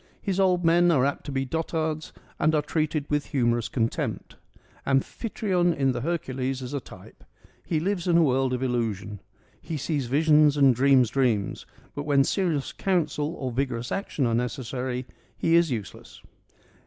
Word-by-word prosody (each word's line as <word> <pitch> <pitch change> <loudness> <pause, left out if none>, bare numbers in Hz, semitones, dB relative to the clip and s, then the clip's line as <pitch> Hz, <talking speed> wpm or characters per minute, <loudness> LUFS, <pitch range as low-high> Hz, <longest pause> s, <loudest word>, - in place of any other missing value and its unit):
His 195 -1 -2
old 180 -2 +2
men 175 +1 +5
are 135 -6 +3
apt 140 +1 -3
to - - -4
be 135 0 -1
dotards 160 +1 -2 0.3
and 155 +1 +3
are 150 - +1
treated 155 -1 -1
with 150 -1 -1
humorous 120 -3 0
contempt. 115 -3 -2 0.5
Amphitryon 175 - 0
in 135 -1 +2
the 120 -1 -3
Hercules 135 -4 -2
is 125 - -6
a 140 - -1
type: - - -15 0.4
he 160 - -1
lives 185 +1 -2
in 170 -1 +4
a 170 - +5
world 135 -2 +2
of 130 0 -2
illusion: 110 -5 -2 0.4
he 160 - -4
sees 145 -2 -2
visions 150 +2 +4
and 135 -2 +6
dreams 130 -1 +4
dreams, 120 -7 0 0.3
but 145 - -4
when 140 -2 +4
serious 165 -3 -1
counsel 170 -4 -1
or 130 -5 -4
vigorous 125 -1 -2
action 175 -8 -1
are 115 - +1
necessary 125 +1 -3 0.3
he 165 - +1
is 170 -1 +5
useless. 110 -7 -7
140 Hz, 165 wpm, -26 LUFS, 125-165 Hz, 0.5 s, and